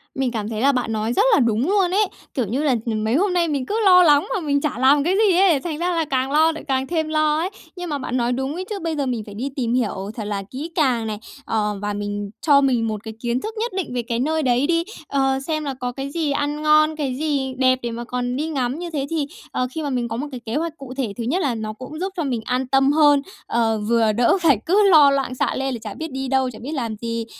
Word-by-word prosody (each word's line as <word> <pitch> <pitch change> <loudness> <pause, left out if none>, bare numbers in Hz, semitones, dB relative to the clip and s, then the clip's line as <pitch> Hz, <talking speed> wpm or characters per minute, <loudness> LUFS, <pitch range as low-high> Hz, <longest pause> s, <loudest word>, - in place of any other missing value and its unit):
Mình 265 -2 0
cảm 215 -3 -3
thấy 220 -1 -3
là 280 +2 +5
bạn 250 -4 -1
nói 220 +2 -1
rất 395 - +3
là - - +5
đúng 235 +1 +1
luôn 390 -3 +2
ấy, 415 +3 +3 0.3
kiểu 255 - 0
như 250 +9 -2
là, 275 -4 +3
ừm, 220 -2 -1
mấy 220 +3 +1
hôm 375 +4 +2
nay 345 -1 +2
mình 280 -4 -1
cứ 425 - -1
lo 360 -2 +8
lắng 295 -3 +4
mà - - 0
mình 285 -4 0
chả 295 -7 -2
làm 275 +2 +5
cái 355 +5 +1
gì 365 -3 +3
ấy, 365 -6 +5
thành 310 +1 -4
ra 350 +2 0
là 325 -1 +1
càng 265 -2 -1
lo 315 +2 +4
lại 315 - -8
càng 265 -1 0
thêm 320 -1 -1
lo 310 -1 +2
ấy. 340 +4 -1 0.3
Nhưng 355 -1 -6
mà 295 - -1
bạn 255 -2 -3
nói 240 0 +1
đúng 265 +3 -2
ấy 365 +3 -5
chứ, 415 -2 -3
bây 330 -2 -2
giờ 285 -2 -1
mình 245 -4 -2
phải 205 - -10
đi 255 +6 -3
tìm 240 -3 -1
hiểu 210 -5 -1
thật 220 - -4
là 205 -1 -3
kỹ 295 +6 -6
càng 250 -8 +1
này, 210 -1 -4 0.3
ờ, 210 -2 -1
và 205 0 -2
mình 205 0 -4
cho 285 -3 +5
mình 245 -4 +2
một 215 -1 -4
cái 220 - -7
kiến 240 +1 -1
thức 440 - -5
nhất 465 +2 -1
định 360 -9 -3
về 245 - 0
cái 230 0 -3
nơi 315 +4 0
đấy 250 +1 +2
đi, 335 -1 +2 0.2
ờ, 270 -1 +1
xem 310 -2 -1
là 275 - -2
có 245 0 -2
cái 270 +2 -5
gì 315 -2 -1
ăn 290 +1 -1
ngon, 305 0 +4
cái 280 -4 -2
gì 280 -2 -1
đẹp 255 0 +3
để 235 - -2
mà 235 +1 -5
còn 245 0 -3
đi 300 +4 -2
ngắm 270 -2 -2
như 350 0 -5
thế 285 -4 -2
thì, 320 -3 -1 0.3
ờ, 250 - -1
khi 315 +3 -4
mà 290 - -2
mình 250 -3 -1
có 225 0 -4
một 285 +5 -3
cái 255 - -6
kế 225 - -3
hoạch 325 +1 -2
cụ 270 -2 -9
thể, 240 -7 -2
thứ 235 - -3
nhất 305 +11 0
là 270 -7 0
nó 215 -1 -4
cũng 260 +7 -9
giúp 380 +2 -3
cho 335 - 0
mình 250 -5 -2
an 255 +1 -1
tâm 270 +1 +3
hơn, 290 -2 +5 0.3
ờ, 225 -2 +1
vừa 230 -2 +3
đỡ 235 - +3
phải 300 -8 +5
cứ 400 +3 +4
lo 300 -5 +7
loạn 270 -2 -1
xạ - - 0
lên 270 -1 -1
là 235 - -5
chả 215 - -6
biết 320 -2 -6
đi 265 0 -3
đâu, 265 -1 +1
chả 220 - -10
biết 275 - -6
làm 230 -6 -3
gì, 230 -1 -3
270 Hz, 290 wpm, -22 LUFS, 240-310 Hz, 0.3 s, lo